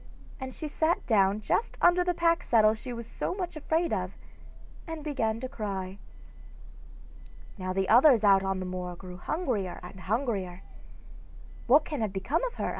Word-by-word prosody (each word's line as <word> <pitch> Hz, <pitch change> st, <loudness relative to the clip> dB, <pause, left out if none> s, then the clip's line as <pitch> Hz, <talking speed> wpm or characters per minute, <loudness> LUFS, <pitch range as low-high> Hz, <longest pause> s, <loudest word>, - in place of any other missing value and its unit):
and 260 Hz, -1 st, -5 dB
she 310 Hz, -, -6 dB
sat 315 Hz, +3 st, 0 dB
down 200 Hz, -2 st, +3 dB
just 320 Hz, -, -1 dB
under 350 Hz, 0 st, +5 dB
the 355 Hz, 0 st, +1 dB
pack 335 Hz, 0 st, +2 dB
saddle 215 Hz, -2 st, +4 dB
she 240 Hz, +3 st, -7 dB
was 235 Hz, -1 st, -6 dB
so 355 Hz, -, -4 dB
much 360 Hz, -3 st, -4 dB
afraid 320 Hz, +3 st, 0 dB
of, -, -, -3 dB, 0.7 s
and 325 Hz, -2 st, -6 dB
began 230 Hz, -7 st, -1 dB
to 260 Hz, -, -4 dB
cry. 195 Hz, -5 st, -5 dB, 1.6 s
Now 185 Hz, 0 st, -3 dB
the 190 Hz, 0 st, 0 dB
others 245 Hz, -1 st, +6 dB
out 195 Hz, -2 st, +6 dB
on 195 Hz, 0 st, -1 dB
the 185 Hz, -, -4 dB
moor 180 Hz, -1 st, -5 dB
grew 180 Hz, 0 st, -10 dB
hungrier 220 Hz, -, -2 dB
and 180 Hz, +2 st, -10 dB
hungrier. 195 Hz, -3 st, -2 dB, 1.0 s
'What 285 Hz, +5 st, +6 dB
can 295 Hz, -6 st, -4 dB
have 210 Hz, -3 st, -1 dB
become 240 Hz, -, -1 dB
of -, -, -5 dB
her? -, -, -2 dB
225 Hz, 170 wpm, -28 LUFS, 190-310 Hz, 1.6 s, others